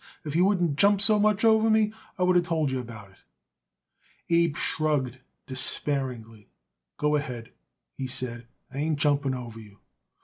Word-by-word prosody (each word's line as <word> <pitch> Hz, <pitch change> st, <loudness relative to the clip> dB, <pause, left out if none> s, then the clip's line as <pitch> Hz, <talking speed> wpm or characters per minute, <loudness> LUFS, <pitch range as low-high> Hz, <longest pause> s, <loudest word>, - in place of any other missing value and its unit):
If 150 Hz, 0 st, -4 dB
you 175 Hz, +2 st, +4 dB
wouldn't 175 Hz, -7 st, +1 dB
jump 200 Hz, 0 st, +5 dB
so 210 Hz, +1 st, +4 dB
much 210 Hz, +1 st, +2 dB
over 220 Hz, 0 st, +4 dB
me, 215 Hz, -1 st, +3 dB, 0.2 s
I 180 Hz, -, 0 dB
would 180 Hz, 0 st, +3 dB
of 175 Hz, -, +4 dB
told 160 Hz, -4 st, 0 dB
you 130 Hz, -, -1 dB
about 110 Hz, -5 st, -10 dB
it." 95 Hz, -, -24 dB, 1.1 s
Abe 170 Hz, -2 st, +3 dB
shrugged 145 Hz, -6 st, -1 dB, 0.3 s
despairingly. 130 Hz, -5 st, -2 dB, 0.5 s
"Go 150 Hz, 0 st, +1 dB
ahead," 125 Hz, -4 st, -6 dB, 0.4 s
he 135 Hz, -, -5 dB
said. 120 Hz, -2 st, -3 dB, 0.3 s
"I 135 Hz, -, -5 dB
ain't 155 Hz, 0 st, 0 dB
jumping 145 Hz, -2 st, +1 dB
over 120 Hz, -3 st, -8 dB
you." 105 Hz, -2 st, -14 dB
145 Hz, 160 wpm, -26 LUFS, 125-180 Hz, 1.1 s, jump